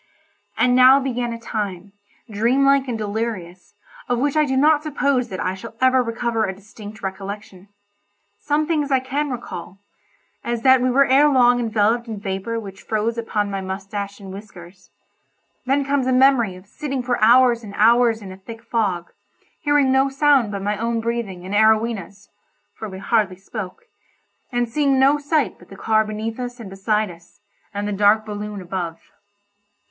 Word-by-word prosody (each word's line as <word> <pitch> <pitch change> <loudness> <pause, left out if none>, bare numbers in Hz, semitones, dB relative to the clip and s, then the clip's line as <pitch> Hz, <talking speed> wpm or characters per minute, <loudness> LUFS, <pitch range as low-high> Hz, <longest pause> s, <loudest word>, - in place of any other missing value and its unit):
And 250 0 +3
now 255 +2 +7
began 245 -3 -2
a 230 - -6
time, 200 -4 -5 0.3
dream 235 +6 +1
like 275 -1 +3
and 240 -3 -2
delirious, 205 -4 -5 0.3
of 245 - +1
which 280 +4 0
I 305 0 +4
do 265 -2 -1
not 300 +2 +4
suppose 280 -4 0
that 185 - -6
I 185 - -1
shall 225 +4 -10
ever 260 0 +4
recover 230 -1 -1
a 190 -3 -2
distinct 210 +1 -12
recollection. 195 0 -7 0.7
Some 300 +1 0
things 300 -3 0
I 265 -1 +3
can 280 +3 -2
recall—as 225 +1 -8
that 260 -1 +6
we 255 - +2
were 275 +2 +4
ere 275 +3 +5
long 245 -3 +4
enveloped 225 +1 +1
in 220 -3 -5
vapour 200 +3 -3
which 195 -3 -10
froze 220 +1 -1
upon 210 -3 -2
my 195 -1 -3
moustache 200 +2 -5
and 195 -2 -9
whiskers; 190 -3 -12 0.8
then 275 +1 +2
comes 275 -2 0
a - - +2
memory 255 -6 +4
of 185 +1 -14
sitting 270 +4 -4
for 245 -2 -1
hours 240 0 +5
and 200 -2 -9
hours 230 0 +4
in 190 - -8
a 185 - -10
thick 225 +4 -11
fog, 195 -8 -2 0.5
hearing 290 -2 +2
no 265 +1 +3
sound 275 -5 +3
but 200 -1 -4
my 205 +1 -1
own 230 0 -1
breathing 225 -6 -4
and 190 - -6
Arowhena's 215 -2 +1 0.4
(for 220 - -7
we 190 - -8
hardly 200 -1 0
spoke) 195 - -8 0.7
and 245 -1 0
seeing 275 +3 +1
no 275 +3 +4
sight 290 0 0
but - - -18
the 195 - -12
car 220 +2 +2
beneath 220 +2 -5
us 245 0 -5
and 205 -5 -9
beside 210 +1 0
us, 170 +3 -18 0.3
and 205 0 -3
the 205 - -2
dark 205 +2 +3
balloon 210 -1 -6
above. 175 -2 -4
225 Hz, 175 wpm, -21 LUFS, 200-255 Hz, 0.8 s, now